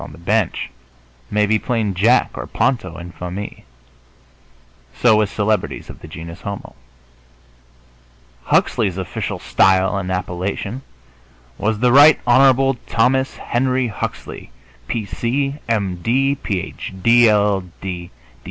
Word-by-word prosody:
on -, -, -9 dB
the -, -, -13 dB
bench, 100 Hz, +2 st, -1 dB, 0.6 s
may 105 Hz, 0 st, +2 dB
be 110 Hz, +1 st, +2 dB
plain 110 Hz, -5 st, -1 dB
Jack 110 Hz, +7 st, +3 dB
or -, -, -6 dB
Ponto 120 Hz, -10 st, -1 dB
en 85 Hz, +1 st, -8 dB
famille. 90 Hz, +4 st, -7 dB, 1.3 s
So 115 Hz, -, +4 dB
with 105 Hz, -2 st, +2 dB
celebrities 105 Hz, +1 st, -1 dB
of -, -, -14 dB
the -, -, -10 dB
genus 85 Hz, +3 st, -9 dB
homo. 100 Hz, 0 st, -7 dB, 1.7 s
Huxley's 95 Hz, -5 st, +1 dB
official 95 Hz, -2 st, -4 dB
style 95 Hz, +1 st, +3 dB
and 95 Hz, -1 st, -3 dB
appellation 95 Hz, +6 st, -3 dB, 0.8 s
was 110 Hz, 0 st, 0 dB
"The 125 Hz, +1 st, +3 dB
Right 145 Hz, +4 st, +7 dB
Hon. 135 Hz, +1 st, +4 dB
Thomas 130 Hz, +3 st, +1 dB
Henry 130 Hz, +1 st, 0 dB
Huxley, 105 Hz, -, -6 dB, 0.4 s
P. 115 Hz, -3 st, -2 dB
C., 135 Hz, +7 st, -2 dB
M. 100 Hz, -5 st, 0 dB
D., 130 Hz, +9 st, +1 dB
Ph. 100 Hz, -9 st, -5 dB
D., 120 Hz, -1 st, +6 dB
LL. 105 Hz, -2 st, +2 dB
110 Hz, 120 wpm, -19 LUFS, 95-125 Hz, 1.7 s, Right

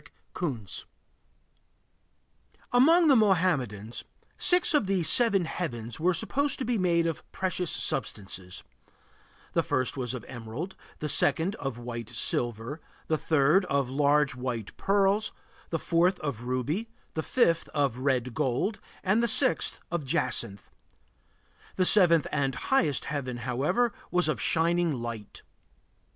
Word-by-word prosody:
Among 325 Hz, +7 st, +5 dB
the 280 Hz, -, +6 dB
Mohammedans, 160 Hz, -, +1 dB, 0.3 s
six 360 Hz, -1 st, +3 dB
of 290 Hz, -10 st, +2 dB
the 190 Hz, -3 st, +1 dB
seven 200 Hz, -1 st, +4 dB
heavens 120 Hz, -8 st, -5 dB
were 175 Hz, +2 st, +2 dB
supposed 280 Hz, +7 st, 0 dB
to 265 Hz, -, -3 dB
be 235 Hz, -2 st, 0 dB
made 170 Hz, -2 st, +2 dB
of 165 Hz, -2 st, -4 dB
precious 185 Hz, -2 st, -2 dB
substances: 95 Hz, -2 st, -4 dB, 0.9 s
the -, -, +3 dB
first 130 Hz, +1 st, -1 dB
was 125 Hz, -1 st, -2 dB
of 125 Hz, -, -8 dB
emerald; 120 Hz, -, -7 dB, 0.2 s
the 150 Hz, -, -4 dB
second, 170 Hz, +5 st, +2 dB
of 135 Hz, -4 st, -4 dB
white 120 Hz, -2 st, -6 dB
silver; 120 Hz, +3 st, -2 dB, 0.3 s
the 160 Hz, -, +2 dB
third, 155 Hz, +5 st, +3 dB
of 140 Hz, -5 st, -1 dB
large 145 Hz, 0 st, +2 dB
white 125 Hz, -4 st, -5 dB
pearls; 200 Hz, +2 st, +1 dB, 0.4 s
the 165 Hz, -, -1 dB
fourth, 175 Hz, +3 st, +1 dB
of 125 Hz, -6 st, -4 dB
ruby; 145 Hz, -, -2 dB, 0.2 s
the 160 Hz, -, -2 dB
fifth, 170 Hz, -, +1 dB
of 140 Hz, -5 st, -1 dB
red 130 Hz, -2 st, 0 dB
gold; 150 Hz, -, -1 dB, 0.2 s
and 200 Hz, +4 st, +2 dB
the 235 Hz, -, +2 dB
sixth, 165 Hz, -6 st, +2 dB
of 170 Hz, -3 st, -2 dB
jacinth. 115 Hz, -5 st, -1 dB, 1.0 s
The 185 Hz, -, +2 dB
seventh 175 Hz, -6 st, +6 dB
and 135 Hz, -3 st, 0 dB
highest 160 Hz, -, +1 dB
heaven, 130 Hz, -4 st, -4 dB
however, 135 Hz, -, 0 dB, 0.2 s
was 180 Hz, -1 st, +2 dB
of 135 Hz, -9 st, -1 dB
shining 170 Hz, +3 st, +1 dB
light. 115 Hz, -3 st, -7 dB
155 Hz, 130 wpm, -28 LUFS, 125-190 Hz, 1.0 s, the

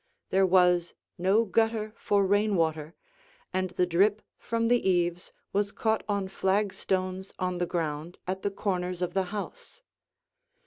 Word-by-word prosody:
There 190 Hz, 0 st, +4 dB
was 180 Hz, -1 st, +3 dB, 0.2 s
no 195 Hz, +6 st, +3 dB
gutter 220 Hz, +1 st, 0 dB
for 200 Hz, -3 st, +1 dB
rain 205 Hz, +1 st, +2 dB
water, 160 Hz, -1 st, -1 dB, 0.6 s
and 185 Hz, 0 st, 0 dB
the 180 Hz, 0 st, +1 dB
drip 195 Hz, +5 st, +2 dB, 0.2 s
from 230 Hz, 0 st, -1 dB
the 240 Hz, -4 st, +3 dB
eaves 175 Hz, -1 st, 0 dB, 0.2 s
was 200 Hz, 0 st, +1 dB
caught 220 Hz, +1 st, 0 dB
on 200 Hz, -2 st, 0 dB
flagstones 190 Hz, -1 st, -1 dB
on 180 Hz, -1 st, -2 dB
the 175 Hz, -, 0 dB
ground 160 Hz, 0 st, -3 dB
at 190 Hz, +1 st, -3 dB
the 200 Hz, -, 0 dB
corners 180 Hz, -2 st, -2 dB
of 180 Hz, -, -2 dB
the 190 Hz, -1 st, +1 dB
house. 470 Hz, -, -7 dB
190 Hz, 145 wpm, -28 LUFS, 180-205 Hz, 0.6 s, There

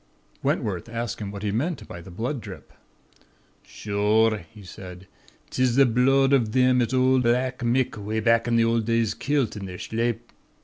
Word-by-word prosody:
"Wentworth 95 Hz, 0 st, -2 dB
asked 115 Hz, -1 st, -4 dB
him 100 Hz, -, -4 dB
what 100 Hz, 0 st, -8 dB
he 105 Hz, -, -1 dB
meant 145 Hz, -, -2 dB
by 85 Hz, -, -9 dB
the 85 Hz, -, -12 dB
blood 120 Hz, +8 st, -4 dB
drip. -, -, -11 dB, 0.9 s
"'Shure,' 105 Hz, +1 st, 0 dB
he 105 Hz, -2 st, -14 dB
said, 90 Hz, 0 st, -10 dB, 0.5 s
''tis 130 Hz, -2 st, +1 dB
the 135 Hz, 0 st, +6 dB
bhlood 135 Hz, +3 st, +3 dB
av 125 Hz, -5 st, +3 dB
thim 125 Hz, +2 st, +3 dB
as 115 Hz, -, -1 dB
ould 130 Hz, 0 st, +3 dB
Black 125 Hz, +2 st, +1 dB
Mick 125 Hz, +1 st, 0 dB
'way 105 Hz, +2 st, -3 dB
back 115 Hz, +1 st, +2 dB
in 120 Hz, -, +1 dB
the 115 Hz, -, +4 dB
ould 115 Hz, -1 st, +1 dB
days 115 Hz, -1 st, +1 dB
kilt 140 Hz, -6 st, -1 dB
in 100 Hz, -2 st, -6 dB
their 90 Hz, -1 st, -7 dB
shlape. 115 Hz, +2 st, -3 dB
115 Hz, 180 wpm, -25 LUFS, 105-125 Hz, 0.9 s, the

